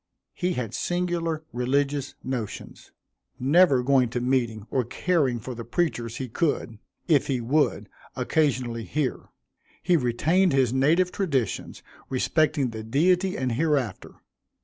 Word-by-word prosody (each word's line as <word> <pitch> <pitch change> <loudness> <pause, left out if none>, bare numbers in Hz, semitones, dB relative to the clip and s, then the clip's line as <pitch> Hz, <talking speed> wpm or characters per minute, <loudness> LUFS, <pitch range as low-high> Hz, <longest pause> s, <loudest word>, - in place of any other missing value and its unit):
He 180 0 -1
had 120 -7 -4
singular 175 -3 -1
religious 140 +3 0
notions 125 -5 -6 0.5
never 140 -1 +4
going 130 -2 +3
to 120 - -2
meeting 120 -4 0
or 130 - +1
caring 135 -1 0
for 125 +3 -6
the 115 0 -7
preachers 120 -4 -2
he 130 - -4
could, 120 -4 -1 0.3
if 150 -5 +3
he 130 -3 0
would, 140 +6 +1 0.3
occasionally 125 -7 0
hear. 145 -4 -2 0.5
He 175 0 +4
retained 160 +8 +2
his 130 -3 +2
native 165 +7 +3
traditions 140 - -2 0.3
respecting 145 0 +1
the 110 -1 -6
Deity 180 - +1
and 130 -1 -1
hereafter. 135 - -1
135 Hz, 125 wpm, -25 LUFS, 120-160 Hz, 0.5 s, never